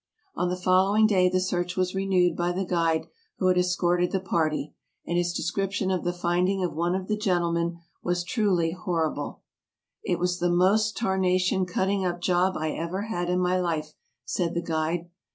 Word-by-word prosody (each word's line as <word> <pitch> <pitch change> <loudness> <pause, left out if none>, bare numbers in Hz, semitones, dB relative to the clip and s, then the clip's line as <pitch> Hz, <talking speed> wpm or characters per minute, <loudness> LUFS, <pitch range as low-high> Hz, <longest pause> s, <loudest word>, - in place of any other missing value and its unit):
On 180 - -1
the 180 - -1
following 190 +4 +4
day 185 -4 +4
the 185 0 +1
search 180 -1 -2
was 185 0 0
renewed 190 -2 +2
by 175 0 0
the 190 +2 -2
guide 165 -2 +1 0.3
who 185 - +2
had 180 - +3
escorted 180 0 +1
the 190 - 0
party, 155 -5 -1 0.3
and 170 - -2
his 175 0 +1
description 195 +1 -1
of 185 - -1
the 175 - 0
finding 180 +2 0
of 180 - -1
one 170 +3 0
of 190 0 -3
the 215 - +1
gentlemen 170 -4 0 0.2
was 175 0 -1
truly 180 -4 +1
horrible: 165 -5 -3 0.6
"It 175 - 0
was 180 +1 -1
the 175 - +1
most 200 +5 +3
tarnation 185 -2 +1
cutting 190 +2 0
up 175 -1 -1
job 180 +1 +1
I 155 0 -1
ever 170 +6 -3
had 175 -5 -3
in 180 0 +1
my 180 0 +1
life," 155 -3 -2 0.3
said 175 -3 -1
the 170 - -1
guide. 165 +1 -1
180 Hz, 185 wpm, -26 LUFS, 175-190 Hz, 0.6 s, following